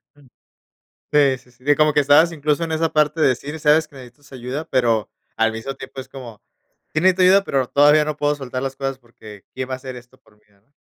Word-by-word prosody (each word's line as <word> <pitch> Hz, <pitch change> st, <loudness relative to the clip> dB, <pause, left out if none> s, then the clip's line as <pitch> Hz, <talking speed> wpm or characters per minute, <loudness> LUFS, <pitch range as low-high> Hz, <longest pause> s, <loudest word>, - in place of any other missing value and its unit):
Ujú. 145 Hz, -3 st, -22 dB, 0.8 s
Sí, 140 Hz, -3 st, +3 dB
sí, 125 Hz, 0 st, -24 dB
sí, 125 Hz, +1 st, -26 dB
de 145 Hz, +1 st, +3 dB
como 155 Hz, 0 st, +3 dB
que 150 Hz, -, +4 dB
estabas 145 Hz, +4 st, +4 dB
incluso 150 Hz, +1 st, -1 dB
en 165 Hz, -, -5 dB
esa 160 Hz, 0 st, -1 dB
parte 150 Hz, +1 st, +1 dB
de 155 Hz, -, +5 dB
decir, 140 Hz, +5 st, -3 dB
sabes 150 Hz, +2 st, +3 dB
que -, -, -23 dB
necesitas 130 Hz, +2 st, -15 dB
ayuda, 130 Hz, +4 st, -5 dB
pero, 115 Hz, -5 st, 0 dB, 0.3 s
al 115 Hz, 0 st, +1 dB
mismo 110 Hz, +5 st, -6 dB
tiempo 130 Hz, 0 st, -9 dB
es 130 Hz, -, -11 dB
como: 125 Hz, -6 st, -11 dB, 0.5 s
"Sí 155 Hz, -, 0 dB
necesito 185 Hz, 0 st, +3 dB
ayuda, 195 Hz, +2 st, +5 dB
pero, 135 Hz, -8 st, -1 dB
todavía 150 Hz, +3 st, +4 dB
no 155 Hz, 0 st, -3 dB
puedo 145 Hz, 0 st, 0 dB
soltar 130 Hz, -2 st, -6 dB
las 135 Hz, 0 st, -4 dB
cosas 135 Hz, 0 st, -4 dB
porque, 110 Hz, -4 st, -15 dB
¿quién 130 Hz, 0 st, -5 dB
va -, -, -3 dB
a -, -, -1 dB
hacer 130 Hz, -1 st, -9 dB
esto 125 Hz, +1 st, -15 dB
por 110 Hz, -4 st, -27 dB
mí, 105 Hz, -, -35 dB
no?" 100 Hz, +7 st, -34 dB
135 Hz, 235 wpm, -20 LUFS, 125-150 Hz, 0.8 s, de